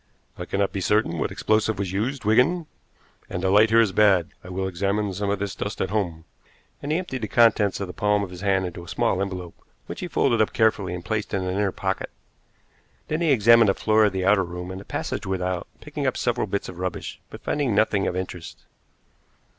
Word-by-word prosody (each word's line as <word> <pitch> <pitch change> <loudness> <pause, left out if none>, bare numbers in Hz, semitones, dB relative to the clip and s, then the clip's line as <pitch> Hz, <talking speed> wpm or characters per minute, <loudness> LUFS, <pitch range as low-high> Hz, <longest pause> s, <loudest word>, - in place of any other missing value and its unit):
"I - - -6
cannot 100 0 0
be 95 - -3
certain 100 -4 +1
what - - 0
explosive 110 -1 +1
was 95 -2 -2
used, 115 +6 -2
Wigan, 140 +11 +3 0.6
and 90 - -4
the 95 - +2
light 105 +3 +6
here 115 +1 +6
is 110 -4 +2
bad. 95 -5 +4
I 90 - -10
will 95 +1 -2
examine 100 +2 -1
some 100 +2 -2
of 100 - +1
this 100 0 -3
dust 100 - -5
at 95 - -1
home," 85 -6 -2 0.6
and 145 - -4
he 155 - +2
emptied 175 -9 -4
the 110 - -2
contents 110 -4 +3
of 100 - -2
the 90 - -8
palm 105 +5 +1
of 95 - -6
his 90 0 -9
hand 95 -2 +1
into 90 -1 -6
a - - -13
small 95 - 0
envelope, 90 -3 -4 0.3
which - - -7
he 180 - -4
folded 120 -8 +2
up 110 - +1
carefully 100 -5 +1
and 90 0 -8
placed 110 -2 -2
in 95 - -1
an 90 0 -2
inner 100 0 +1
pocket. - - -3 1.0
Then 155 +2 -1
he 165 -3 +3
examined 115 -2 +6
the 95 - +2
floor 110 0 +3
of 105 - +2
the 95 -1 -1
outer 100 0 +4
room, 90 +1 -6
and 95 +1 -7
the - - -14
passage - - -4
without, 90 -1 -2
picking 150 -2 -4
up 130 - 0
several 120 -2 0
bits 100 +1 -2
of 90 - -9
rubbish, 90 -1 -4
but - - -11
finding 140 -8 0
nothing 105 -1 +2
of - - -2
interest. 85 -8 -6
100 Hz, 225 wpm, -24 LUFS, 95-110 Hz, 1.0 s, light